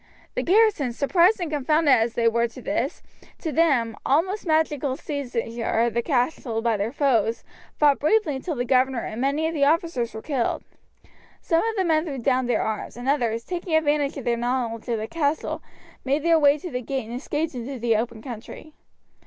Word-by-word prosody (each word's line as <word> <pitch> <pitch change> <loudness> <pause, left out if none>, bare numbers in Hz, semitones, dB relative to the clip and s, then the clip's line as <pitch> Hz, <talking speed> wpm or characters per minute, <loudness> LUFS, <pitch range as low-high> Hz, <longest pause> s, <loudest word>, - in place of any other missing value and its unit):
The - - -1
garrison, 385 - +3
surprised 345 - +3
and 340 -4 -3
confounded 300 +1 +2
as 230 -1 +2
they 230 -1 +2
were 230 +1 +2
at 235 0 0
this, - - -3 0.3
to 320 - -4
them, 275 -9 +2
almost 370 +8 +1
magical 300 -4 +1
seizure 240 -6 -4 0.2
of 235 - -1
the 235 - +1
castle 245 -3 -1
by 230 -2 +2
their 205 +2 -2
foes, 235 -6 +1 0.3
fought 290 -2 +4
bravely 310 -1 +2
until 300 +4 -4
the 245 -1 -2
governor 255 -1 +2
and 220 +3 -5
many 285 +4 +1
of 325 - -3
the 285 -3 +2
officers 300 -7 0
were 220 - -7
killed. 265 -6 -1 0.8
Some 330 0 +1
of 450 0 -1
the 380 -3 +1
men 315 -1 +2
threw 285 -5 -4
down 255 0 +1
their 245 - +1
arms, 220 +1 -4
and 245 +1 -6
others, 235 -5 +1
taking 345 0 -3
advantage 295 -2 +1
of 270 - -7
their 235 -1 +1
knowledge 240 -1 -2
of 230 - +1
the 215 0 -4
castle, 310 0 -1 0.4
made 280 +3 0
their 335 -1 +4
way 290 -1 +5
to 345 +3 -7
the 250 - -3
gate 265 0 -3
and 230 - -7
escaped 310 +2 -2
into 255 +2 -5
the 230 -1 +1
open 225 0 -3
country. 250 +5 -9
275 Hz, 195 wpm, -24 LUFS, 235-315 Hz, 0.8 s, way